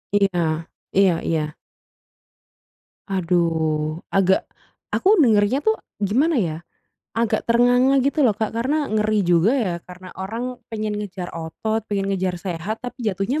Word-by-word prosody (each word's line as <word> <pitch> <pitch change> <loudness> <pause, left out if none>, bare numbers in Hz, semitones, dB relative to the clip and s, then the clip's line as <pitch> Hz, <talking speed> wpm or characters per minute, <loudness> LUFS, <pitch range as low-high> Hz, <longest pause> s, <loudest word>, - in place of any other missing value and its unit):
Iya 200 -1 +5 0.7
iya 195 -1 +5 0.2
iya. 155 -2 -1 1.5
Aduh, 165 -4 0 0.2
agak 190 -1 +3 0.5
aku 400 +1 +4
dengarnya 225 -2 +4
tuh 440 +8 +2 0.2
gimana 255 - +2
ya, 165 -6 -1 0.6
agak 230 0 0
ternganga 245 +3 +4
gitu 280 +3 +1
loh 230 -8 +4
Kak, 220 -1 -2
karena 270 +7 0
ngeri 215 0 +2
juga 175 +5 +4
ya 195 -9 0
karena 180 0 -11
orang 235 +6 -4
pengen 215 -2 -3
ngejar 185 -3 -6
otot, 165 +7 -3
pengen 195 -1 -1
ngejar 185 -1 -1
sehat 180 +3 -4
tapi 245 -2 -3
jatuhnya 200 +9 -1
205 Hz, 130 wpm, -22 LUFS, 180-235 Hz, 1.5 s, Iya